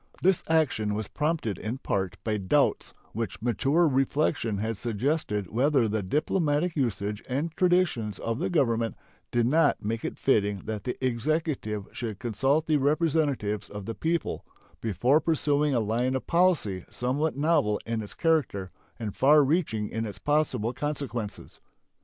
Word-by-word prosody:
This 190 Hz, 0 st, +3 dB
action 135 Hz, -10 st, +1 dB
was 105 Hz, -1 st, -3 dB
prompted 150 Hz, -, -1 dB
in 110 Hz, +5 st, -3 dB
part 95 Hz, -8 st, -2 dB
by 110 Hz, -1 st, 0 dB
doubts 95 Hz, -2 st, +1 dB, 0.2 s
which 115 Hz, 0 st, -4 dB
mature 135 Hz, -, +2 dB
reflection 135 Hz, -4 st, +1 dB
had 110 Hz, +3 st, -2 dB
suggested 110 Hz, -, -1 dB
whether 130 Hz, +1 st, +3 dB
the 110 Hz, 0 st, -1 dB
diplomatic 150 Hz, -, 0 dB
usage 105 Hz, -6 st, -1 dB
and 145 Hz, +6 st, -1 dB
traditions 175 Hz, -, +2 dB
of 115 Hz, +1 st, -3 dB
the -, -, -1 dB
Government 115 Hz, -, +1 dB, 0.3 s
did 120 Hz, -1 st, +1 dB
not 155 Hz, -3 st, +2 dB
make 115 Hz, +2 st, -2 dB
it -, -, -4 dB
fitting 105 Hz, -6 st, +1 dB
that 105 Hz, -2 st, -4 dB
the 125 Hz, -, -2 dB
Executive 130 Hz, -, -1 dB
should 110 Hz, -4 st, -5 dB
consult 135 Hz, +8 st, +1 dB
the 155 Hz, -1 st, +3 dB
representatives 145 Hz, -, 0 dB
of 105 Hz, -1 st, -7 dB
the 115 Hz, -, -3 dB
people 165 Hz, +6 st, -2 dB, 0.4 s
before 125 Hz, -, +2 dB
pursuing 150 Hz, -3 st, +1 dB
a -, -, +3 dB
line 120 Hz, +4 st, 0 dB
of 130 Hz, -, -3 dB
policy 165 Hz, -, +2 dB
somewhat 140 Hz, +5 st, -1 dB
novel 145 Hz, -8 st, +2 dB
in 115 Hz, -1 st, -2 dB
its 105 Hz, -, -7 dB
character 145 Hz, -, 0 dB, 0.3 s
and 110 Hz, -4 st, -5 dB
far 150 Hz, +2 st, +6 dB
reaching 130 Hz, -9 st, 0 dB
in 115 Hz, +1 st, -3 dB
its 105 Hz, -, -7 dB
possible 140 Hz, -6 st, 0 dB
consequences. 135 Hz, -6 st, -4 dB
125 Hz, 150 wpm, -27 LUFS, 110-150 Hz, 0.4 s, far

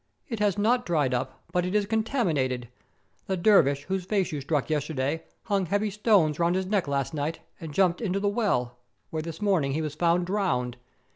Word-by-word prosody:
"It 230 Hz, -5 st, -4 dB
has 205 Hz, -2 st, +2 dB
not 240 Hz, +4 st, +2 dB
dried 150 Hz, -, +1 dB
up, 130 Hz, +1 st, -3 dB
but 180 Hz, -, +1 dB
it 180 Hz, +3 st, -2 dB
is 210 Hz, -1 st, +3 dB
contaminated. 170 Hz, -, 0 dB, 0.6 s
The 190 Hz, -, 0 dB
der 200 Hz, +3 st, +6 dB
vish 140 Hz, 0 st, -1 dB
whose 190 Hz, +3 st, -2 dB
face 190 Hz, -1 st, 0 dB
you 150 Hz, -2 st, -3 dB
struck 145 Hz, 0 st, 0 dB
yesterday 150 Hz, 0 st, -1 dB, 0.2 s
hung 200 Hz, -4 st, 0 dB
heavy 205 Hz, +3 st, 0 dB
stones 195 Hz, -7 st, +3 dB
round 170 Hz, +1 st, +2 dB
his 190 Hz, 0 st, 0 dB
neck 195 Hz, -4 st, 0 dB
last 140 Hz, +2 st, -1 dB
night 150 Hz, +2 st, -2 dB, 0.2 s
and 160 Hz, -2 st, -7 dB
jumped 180 Hz, +3 st, +2 dB
into 195 Hz, -3 st, 0 dB
the 205 Hz, -, 0 dB
well, 125 Hz, -, 0 dB, 0.3 s
where 160 Hz, -, -2 dB
this 165 Hz, +4 st, -6 dB
morning 170 Hz, -10 st, +2 dB
he 155 Hz, -, -1 dB
was 150 Hz, -2 st, -3 dB
found 170 Hz, +2 st, +2 dB
drowned. 175 Hz, -, -1 dB
175 Hz, 200 wpm, -27 LUFS, 145-200 Hz, 0.6 s, der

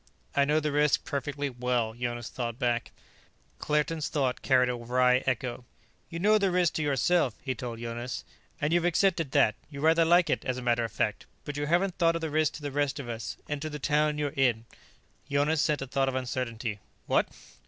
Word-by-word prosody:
"I 140 Hz, -, +4 dB
know 150 Hz, +2 st, +3 dB
the 150 Hz, -1 st, -1 dB
risk 150 Hz, 0 st, +2 dB
perfectly 145 Hz, +1 st, -2 dB
well," 125 Hz, -3 st, -1 dB
Jonas 120 Hz, 0 st, -4 dB
thought 120 Hz, -2 st, -4 dB
back. 120 Hz, -3 st, 0 dB, 0.7 s
Claerten's 150 Hz, +1 st, 0 dB
thought 135 Hz, -4 st, 0 dB
carried 130 Hz, -2 st, +4 dB
a 125 Hz, -, 0 dB
wry 125 Hz, +1 st, +3 dB
echo. 125 Hz, -1 st, -1 dB, 0.5 s
"You 170 Hz, -, -5 dB
know 210 Hz, +5 st, +4 dB
the 195 Hz, -1 st, +2 dB
risk 180 Hz, -2 st, +2 dB
to -, -, -2 dB
yourself," 145 Hz, -2 st, +2 dB
he 130 Hz, -, -1 dB
told 120 Hz, -2 st, -6 dB
Jonas, 120 Hz, +2 st, -5 dB, 0.4 s
"and 150 Hz, +2 st, 0 dB
you've 175 Hz, -1 st, +3 dB
accepted 175 Hz, -3 st, +2 dB
that. 105 Hz, -, +4 dB, 0.2 s
You 140 Hz, -2 st, -8 dB
rather 160 Hz, +2 st, +4 dB
like 175 Hz, +2 st, +4 dB
it, -, -, 0 dB
as 130 Hz, -1 st, -2 dB
a -, -, -4 dB
matter 120 Hz, -1 st, +2 dB
of 115 Hz, -, -3 dB
fact. -, -, -2 dB, 0.2 s
But 145 Hz, -, -5 dB
you 145 Hz, 0 st, -2 dB
haven't 180 Hz, +3 st, +1 dB
thought 165 Hz, -1 st, +4 dB
of 165 Hz, -, -2 dB
the 160 Hz, -2 st, -3 dB
risk 155 Hz, 0 st, +2 dB
to 150 Hz, -, -9 dB
the 145 Hz, -, -3 dB
rest 145 Hz, 0 st, 0 dB
of 135 Hz, -, -6 dB
us 115 Hz, -3 st, -5 dB
and 145 Hz, -1 st, -3 dB
to 155 Hz, -, -3 dB
the 150 Hz, -, -5 dB
town 150 Hz, +1 st, +1 dB
you're 150 Hz, -1 st, 0 dB
in." 120 Hz, -5 st, +2 dB, 0.6 s
Jonas 145 Hz, +2 st, +2 dB
sent 150 Hz, -3 st, +1 dB
a -, -, -4 dB
thought 135 Hz, +1 st, 0 dB
of 130 Hz, -, -4 dB
uncertainty: 120 Hz, -4 st, -3 dB, 0.3 s
"What?" -, -, +2 dB
140 Hz, 210 wpm, -28 LUFS, 125-155 Hz, 0.7 s, I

